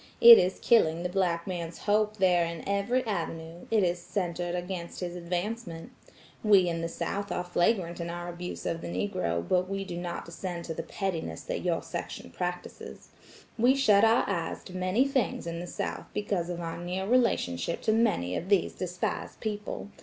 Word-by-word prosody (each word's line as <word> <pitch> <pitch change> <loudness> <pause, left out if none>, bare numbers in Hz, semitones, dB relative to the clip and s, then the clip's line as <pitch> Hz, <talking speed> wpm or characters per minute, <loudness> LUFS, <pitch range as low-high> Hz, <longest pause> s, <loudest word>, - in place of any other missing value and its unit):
It 235 -1 +11
is 185 +1 +1
killing 170 -8 +4
the 180 - -1
black 175 -3 0
man's 175 -3 -4
hope 210 +1 +1
there 180 -3 +4
in 170 -1 -5
every 200 +6 +1
avenue; 165 -4 -4
it 220 -3 +3
is 175 0 +1
centered 175 -1 -2
against 180 -1 -5
his 175 -1 -3
advancement. 180 +1 -4 0.5
We 200 -4 +6
in 165 -1 -1
the 165 - -2
South 200 +4 -3
are 180 - -1
flagrant 175 0 +1
in 170 - -3
our 175 0 -5
abuse 175 +1 -6
of 165 - -2
the - - -5
Negro 170 - -1
but 185 0 +2
we 195 0 -2
do 180 -3 -6
not 175 -1 -4
descend 170 0 -5
to 165 - -4
the - - -4
pettiness 165 - -3
that - - -3
your - - 0
section 85 - -6
practices. 180 - -5 0.5
We 250 +4 +5
shut 215 -7 +5
our 225 +2 +4
eyes 170 -5 -2
to 185 - -10
many 185 +9 +2
things 265 - 0
in 170 0 -4
the 175 - -6
South - - -4
because 200 -4 -1
of 175 -1 -3
our 165 0 -4
near 180 +2 -3
relationship 200 - +1
to - - +3
many 215 - +2
of 180 - -4
these 200 -3 +3
despised 180 -1 -3
people. 210 -1 -4
180 Hz, 185 wpm, -29 LUFS, 170-205 Hz, 0.5 s, It